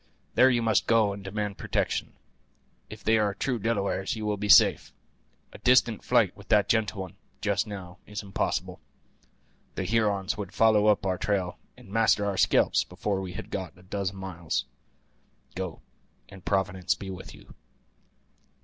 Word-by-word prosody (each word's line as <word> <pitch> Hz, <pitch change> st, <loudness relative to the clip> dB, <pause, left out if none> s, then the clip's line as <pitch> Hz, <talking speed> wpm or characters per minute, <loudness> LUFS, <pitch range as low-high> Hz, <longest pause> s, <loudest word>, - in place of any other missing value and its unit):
There 130 Hz, +2 st, +6 dB
you 120 Hz, -2 st, +1 dB
must 110 Hz, -1 st, +2 dB
go 110 Hz, -3 st, +3 dB
and 100 Hz, 0 st, -9 dB
demand 105 Hz, +1 st, -4 dB
protection; -, -, -1 dB, 0.8 s
if 105 Hz, -1 st, -10 dB
they 110 Hz, 0 st, +3 dB
are 105 Hz, -2 st, 0 dB
true 125 Hz, 0 st, -1 dB
Delawares 100 Hz, -3 st, -1 dB
you 110 Hz, -1 st, -5 dB
will 105 Hz, 0 st, 0 dB
be 105 Hz, 0 st, -4 dB
safe. -, -, +6 dB, 0.6 s
A -, -, -11 dB
distant 125 Hz, -4 st, +3 dB
flight -, -, +2 dB
with -, -, -15 dB
that 105 Hz, -2 st, +3 dB
gentle 105 Hz, -2 st, 0 dB
one, 95 Hz, -2 st, -8 dB, 0.2 s
just 100 Hz, +1 st, 0 dB
now, 95 Hz, -2 st, -8 dB
is 105 Hz, 0 st, -6 dB
impossible. 95 Hz, -1 st, -2 dB, 1.0 s
The -, -, -2 dB
Hurons 105 Hz, -2 st, 0 dB
would 100 Hz, -2 st, -6 dB
follow 110 Hz, -2 st, +4 dB
up 105 Hz, -2 st, +3 dB
our 95 Hz, -1 st, -1 dB
trail, 95 Hz, -4 st, -1 dB, 0.2 s
and -, -, -15 dB
master 110 Hz, -1 st, +3 dB
our 100 Hz, -1 st, -1 dB
scalps -, -, +3 dB
before 100 Hz, +1 st, -3 dB
we 90 Hz, -1 st, -6 dB
had -, -, -8 dB
got 95 Hz, -3 st, -5 dB
a 90 Hz, -, -18 dB
dozen 95 Hz, +1 st, -3 dB
miles. 90 Hz, -4 st, -3 dB, 0.9 s
Go, 95 Hz, -3 st, -5 dB, 0.5 s
and 95 Hz, -2 st, -13 dB
Providence 95 Hz, -2 st, 0 dB
be 95 Hz, -1 st, -7 dB
with 95 Hz, 0 st, -9 dB
you." -, -, -16 dB
100 Hz, 165 wpm, -27 LUFS, 95-110 Hz, 1.0 s, There